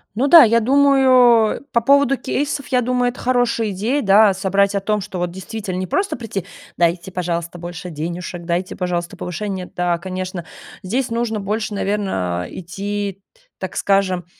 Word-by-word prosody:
Ну 255 Hz, +6 st, +1 dB
да, 325 Hz, 0 st, +10 dB
я 230 Hz, +1 st, +4 dB
думаю 255 Hz, -3 st, +4 dB
по 235 Hz, -, +2 dB
поводу 275 Hz, +1 st, +4 dB
кейсов, 280 Hz, 0 st, -2 dB
я 250 Hz, -1 st, +2 dB
думаю, 250 Hz, 0 st, +1 dB
это 245 Hz, -, -9 dB
хорошая 245 Hz, -3 st, +1 dB
идея, 230 Hz, +10 st, -1 dB
да, 200 Hz, 0 st, +5 dB
собрать 195 Hz, +1 st, +1 dB
о 200 Hz, -, +2 dB
том, 210 Hz, +1 st, -1 dB
что 185 Hz, 0 st, -6 dB
вот, 175 Hz, -1 st, -2 dB
действительно, 190 Hz, +1 st, -6 dB
не 185 Hz, 0 st, -3 dB
просто 395 Hz, -, -1 dB
прийти: 205 Hz, -6 st, -5 dB, 0.3 s
"Дайте, 170 Hz, +1 st, 0 dB
пожалуйста, 170 Hz, -1 st, -3 dB
больше 175 Hz, +1 st, -7 dB
денюшек, 170 Hz, +2 st, -5 dB
дайте, 175 Hz, +2 st, -2 dB
пожалуйста, 175 Hz, -1 st, -3 dB
повышение". 185 Hz, +1 st, -5 dB
Да, 175 Hz, -1 st, 0 dB
конечно, 185 Hz, -1 st, -5 dB, 0.4 s
здесь 240 Hz, +7 st, -1 dB
нужно 230 Hz, -2 st, -1 dB
больше, 210 Hz, +2 st, -3 dB
наверно, 145 Hz, -, -2 dB
идти, 200 Hz, +2 st, -5 dB
т -, -, -30 dB, 0.2 s
так -, -, -6 dB
скажем, 190 Hz, -3 st, +1 dB
200 Hz, 165 wpm, -19 LUFS, 180-235 Hz, 0.4 s, да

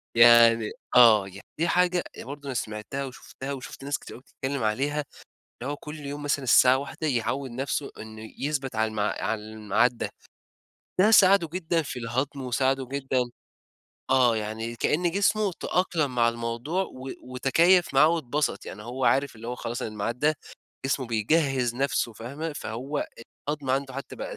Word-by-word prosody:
يعني 115 Hz, -1 st, +7 dB, 0.2 s
آه، 110 Hz, -5 st, +7 dB
يعني 95 Hz, +1 st, -12 dB
دي 165 Hz, -, +2 dB
حاجة 180 Hz, 0 st, +2 dB, 0.2 s
برضه 145 Hz, +3 st, -8 dB
أنا 135 Hz, -, -3 dB
سمعتها 115 Hz, +4 st, -4 dB
وشُفتها 135 Hz, +1 st, -7 dB
وشُفت 135 Hz, 0 st, -8 dB
ناس 145 Hz, +1 st, -1 dB
كتير -, -, -10 dB
أوي -, -, -12 dB
بتتكلِّم 135 Hz, -1 st, -4 dB
عليها، 140 Hz, +7 st, 0 dB, 0.6 s
اللي 135 Hz, +3 st, -2 dB
هو -, -, -4 dB
كل 150 Hz, +1 st, -9 dB
يوم 145 Hz, 0 st, -6 dB
مثلًا 145 Hz, -1 st, 0 dB
الساعة 125 Hz, +1 st, +6 dB
13:00 145 Hz, +3 st, -5 dB
يعوِّد 130 Hz, 0 st, -1 dB
نفسُه 135 Hz, +3 st, -3 dB
إنه 110 Hz, 0 st, -9 dB
يثبت 135 Hz, -4 st, -2 dB
على 110 Hz, -1 st, 0 dB
على 105 Hz, +1 st, -1 dB
الميعاد 110 Hz, +3 st, 0 dB
ده، -, -, -3 dB, 0.9 s
ده 210 Hz, +4 st, +6 dB
ساعدُه 195 Hz, -5 st, +6 dB
جدًا 170 Hz, -2 st, 0 dB
في 140 Hz, -, -6 dB
الهضم 130 Hz, +4 st, -2 dB
وساعدُه 130 Hz, +1 st, 0 dB
جدًا 130 Hz, -2 st, -1 dB, 0.8 s
آه 125 Hz, -3 st, +4 dB
يعني 110 Hz, +2 st, -4 dB
كأن 170 Hz, +8 st, +1 dB
جسمُه 200 Hz, +1 st, +2 dB
تأقلَم 165 Hz, -7 st, 0 dB
مع 120 Hz, -1 st, +4 dB
الموضوع، 115 Hz, +9 st, -2 dB
و 130 Hz, -5 st, -9 dB
وتكيَّف 165 Hz, +8 st, +3 dB
معاه 145 Hz, +3 st, +7 dB
واتبسط، 150 Hz, -3 st, -1 dB
يعني 105 Hz, -, -8 dB
هو 125 Hz, +3 st, -4 dB
عارف 135 Hz, -2 st, +2 dB
اللي 115 Hz, +1 st, -8 dB
هو 125 Hz, -, -2 dB
خلاص 120 Hz, -1 st, -5 dB
الميعاد 110 Hz, +2 st, -3 dB
ده 150 Hz, +3 st, +3 dB, 0.5 s
جسمُه 135 Hz, -1 st, -1 dB
بيجهِّز 125 Hz, +2 st, +1 dB
نفسُه 130 Hz, -2 st, 0 dB
فاهمة، 140 Hz, +9 st, -5 dB
فهو 140 Hz, +1 st, -4 dB, 0.4 s
الهضم 145 Hz, -3 st, -2 dB
عنده 135 Hz, 0 st, -1 dB
حتى 140 Hz, -, -7 dB
بقى -, -, -6 dB
130 Hz, 160 wpm, -26 LUFS, 115-145 Hz, 0.9 s, يعني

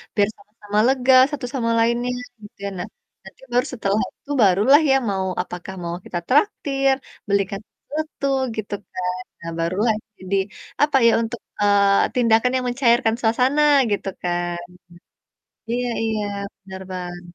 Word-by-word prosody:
biar 205 Hz, -1 st, +3 dB
sama-sama 210 Hz, 0 st, -4 dB
lega 260 Hz, 0 st, +3 dB, 0.2 s
satu 280 Hz, -4 st, -4 dB
sama 230 Hz, -3 st, 0 dB
lainnya 235 Hz, +2 st, +1 dB, 0.3 s
gitu. 205 Hz, -, -14 dB, 0.2 s
Nah, 180 Hz, -, -4 dB, 0.4 s
nanti 190 Hz, -, -15 dB
baru 250 Hz, +1 st, +3 dB
setelah 205 Hz, -2 st, 0 dB, 0.2 s
itu 290 Hz, -, -10 dB
baru 190 Hz, -1 st, +4 dB
lah 295 Hz, +3 st, +8 dB
ya 270 Hz, -, +5 dB
mau 190 Hz, -1 st, -1 dB, 0.2 s
apakah 180 Hz, +1 st, -8 dB
mau 170 Hz, 0 st, -3 dB
kita 175 Hz, -, -3 dB
traktir, 275 Hz, -4 st, +2 dB, 0.3 s
belikan 200 Hz, 0 st, 0 dB
sesuatu 305 Hz, -1 st, -6 dB, 0.3 s
gitu 210 Hz, -1 st, -5 dB, 0.2 s
kan. 180 Hz, 0 st, -3 dB, 0.2 s
Nah 165 Hz, 0 st, -5 dB
baru 170 Hz, +2 st, -1 dB
lah 220 Hz, -2 st, +3 dB, 0.2 s
jadi 190 Hz, +1 st, -2 dB, 0.5 s
apa 295 Hz, -2 st, +3 dB
ya -, -, +6 dB
untuk, 230 Hz, +1 st, -4 dB, 0.2 s
eee, 200 Hz, -1 st, +4 dB
tindakan 235 Hz, 0 st, +3 dB
yang 255 Hz, -, 0 dB
mencairkan 240 Hz, -2 st, +3 dB
suasana 250 Hz, +6 st, +2 dB, 0.3 s
gitu 200 Hz, -, -1 dB, 0.2 s
kan. 175 Hz, 0 st, -1 dB, 1.1 s
Iya 245 Hz, +1 st, -1 dB, 0.2 s
iya 220 Hz, -1 st, -1 dB, 0.4 s
bener, 190 Hz, -1 st, -9 dB
Bang. 175 Hz, -1 st, -6 dB
220 Hz, 145 wpm, -22 LUFS, 190-250 Hz, 1.1 s, lah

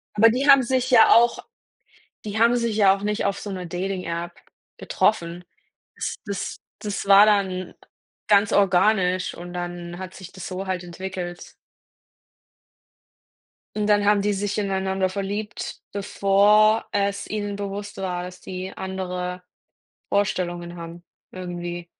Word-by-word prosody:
Aber 225 Hz, +2 st, +7 dB
die 260 Hz, +5 st, 0 dB
haben 275 Hz, -1 st, +8 dB
sich 255 Hz, +1 st, 0 dB
ja 235 Hz, -3 st, +7 dB
auch 235 Hz, +1 st, +5 dB, 0.9 s
die 210 Hz, 0 st, -4 dB
haben 235 Hz, +1 st, +5 dB
sich 235 Hz, -3 st, -1 dB
ja 195 Hz, -3 st, +5 dB
auch 195 Hz, -, -11 dB
nicht 210 Hz, 0 st, -1 dB
auf 200 Hz, 0 st, 0 dB
so 205 Hz, -, -6 dB
'ner 185 Hz, -2 st, -5 dB
Dating-App 175 Hz, -1 st, -4 dB, 0.5 s
getroffen. 175 Hz, -4 st, 0 dB, 0.5 s
Das -, -, -3 dB
das 200 Hz, -2 st, -4 dB, 0.2 s
das 205 Hz, -1 st, -4 dB
war 200 Hz, +1 st, +8 dB
dann 190 Hz, -3 st, 0 dB, 0.5 s
ganz 205 Hz, 0 st, +4 dB
organisch 185 Hz, -1 st, +2 dB
und 175 Hz, 0 st, -9 dB
dann 175 Hz, 0 st, -5 dB
hat 185 Hz, 0 st, -8 dB
sich 190 Hz, -2 st, -11 dB
das 190 Hz, -, -8 dB
so 185 Hz, +1 st, -5 dB
halt 185 Hz, -1 st, -2 dB
entwickelt. 175 Hz, 0 st, -7 dB, 2.2 s
Und 210 Hz, -1 st, 0 dB
dann 205 Hz, -1 st, +3 dB
haben 205 Hz, 0 st, +4 dB
die 205 Hz, +1 st, +1 dB
sich 205 Hz, 0 st, -2 dB
ineinander 190 Hz, -2 st, 0 dB
verliebt, 205 Hz, +2 st, -5 dB
bevor 205 Hz, +2 st, +3 dB
es 200 Hz, 0 st, -1 dB
ihnen 205 Hz, -1 st, -3 dB
bewusst 205 Hz, +1 st, -6 dB
war, 180 Hz, -2 st, -3 dB
dass 180 Hz, 0 st, -9 dB
die 185 Hz, +1 st, -6 dB
andere 180 Hz, -1 st, -4 dB, 0.6 s
Vorstellungen 175 Hz, -3 st, -1 dB
haben 170 Hz, +1 st, -9 dB, 0.3 s
irgendwie. 175 Hz, -1 st, -6 dB
195 Hz, 135 wpm, -23 LUFS, 180-205 Hz, 2.2 s, haben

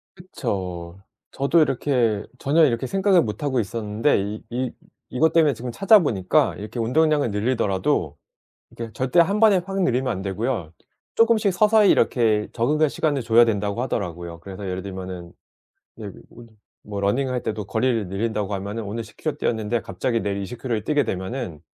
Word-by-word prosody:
그쵸. 95 Hz, -, -5 dB, 0.3 s
저도 140 Hz, +5 st, +2 dB
이렇게 120 Hz, -7 st, +1 dB, 0.2 s
전혀 155 Hz, +4 st, +3 dB
이렇게 125 Hz, -1 st, 0 dB
생각을 195 Hz, +2 st, +3 dB
못 110 Hz, +5 st, -5 dB
하고 135 Hz, -3 st, 0 dB
있었는데 110 Hz, +5 st, 0 dB
이 105 Hz, +2 st, -5 dB
이 125 Hz, +1 st, -2 dB, 0.4 s
이것 160 Hz, +5 st, +2 dB
때문에 155 Hz, -5 st, +4 dB
지금 120 Hz, +2 st, -6 dB
찾아보니까 150 Hz, -, +3 dB
이렇게 105 Hz, +4 st, -7 dB
운동량을 150 Hz, +1 st, +2 dB
늘리더라도 105 Hz, -3 st, 0 dB, 0.5 s
이렇게 115 Hz, -1 st, -8 dB
절대 130 Hz, +6 st, +1 dB
1 195 Hz, +5 st, +3 dB
번에 210 Hz, -3 st, +6 dB
확 195 Hz, 0 st, -2 dB
늘리면 130 Hz, -4 st, +1 dB
안 95 Hz, -, -4 dB
되고요. 100 Hz, -3 st, -3 dB, 0.4 s
쪼끔씩 225 Hz, -3 st, +3 dB
서서히 210 Hz, +1 st, +4 dB
이렇게 110 Hz, -4 st, +2 dB
적응할 150 Hz, +6 st, +2 dB
시간을 145 Hz, -2 st, -1 dB
줘야 115 Hz, +1 st, +6 dB
된다고 105 Hz, +1 st, -1 dB
하더라고요. 85 Hz, -8 st, -4 dB
그래서 100 Hz, +1 st, -8 dB
예를 90 Hz, 0 st, -3 dB
들면은 95 Hz, -3 st, -7 dB, 0.7 s
예 -, -, -5 dB, 0.2 s
뭐 120 Hz, 0 st, -14 dB, 0.4 s
뭐 100 Hz, -1 st, -6 dB
러닝할 125 Hz, +5 st, 0 dB
때도 105 Hz, -2 st, -3 dB
거리를 115 Hz, -2 st, 0 dB
늘린다고 105 Hz, 0 st, -2 dB
하면은 100 Hz, +4 st, -4 dB
오늘 115 Hz, +3 st, -4 dB
10 110 Hz, -, -16 dB
킬로 155 Hz, -, -3 dB
뛰었는데 110 Hz, 0 st, -1 dB
갑자기 115 Hz, +5 st, -2 dB
내일 100 Hz, -1 st, -2 dB
20 115 Hz, +5 st, -7 dB
킬로를 115 Hz, -5 st, -2 dB
뛰게 145 Hz, +1 st, +1 dB
되면은 95 Hz, -, -4 dB
115 Hz, 375 characters per minute, -23 LUFS, 100-145 Hz, 0.7 s, 번에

